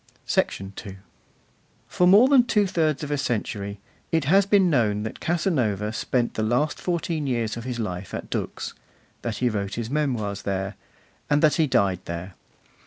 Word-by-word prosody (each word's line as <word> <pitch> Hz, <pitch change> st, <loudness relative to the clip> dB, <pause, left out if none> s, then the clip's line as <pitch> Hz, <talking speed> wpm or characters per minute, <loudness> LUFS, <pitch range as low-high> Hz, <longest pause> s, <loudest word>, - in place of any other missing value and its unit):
II -, -, +5 dB, 1.4 s
For 180 Hz, -, +2 dB
more 205 Hz, +7 st, +7 dB
than 270 Hz, -3 st, +6 dB
two 210 Hz, -4 st, +3 dB
thirds 155 Hz, -5 st, 0 dB
of 150 Hz, -, -4 dB
a 145 Hz, -, 0 dB
century 100 Hz, -5 st, -2 dB, 0.3 s
it 160 Hz, -2 st, +2 dB
has 195 Hz, +6 st, +4 dB
been 200 Hz, -2 st, +5 dB
known 110 Hz, -9 st, +2 dB
that 110 Hz, -, -6 dB
Casanova 120 Hz, -, 0 dB
spent 120 Hz, +1 st, 0 dB
the -, -, -2 dB
last 120 Hz, +8 st, +1 dB
fourteen 170 Hz, -4 st, -1 dB
years 115 Hz, -4 st, -1 dB
of 115 Hz, 0 st, -7 dB
his 125 Hz, -2 st, -3 dB
life 95 Hz, -5 st, -4 dB
at -, -, -7 dB
Dux, -, -, -3 dB, 0.5 s
that 115 Hz, -3 st, -3 dB
he 125 Hz, -, +1 dB
wrote 100 Hz, -3 st, -3 dB
his 115 Hz, +1 st, -4 dB
Memoirs 120 Hz, -9 st, -1 dB
there, 95 Hz, 0 st, -2 dB, 0.6 s
and 145 Hz, +1 st, +3 dB
that 155 Hz, -, +4 dB
he 160 Hz, -2 st, +3 dB
died 95 Hz, -8 st, +2 dB
there. 85 Hz, +2 st, -6 dB
125 Hz, 170 wpm, -25 LUFS, 105-160 Hz, 1.4 s, more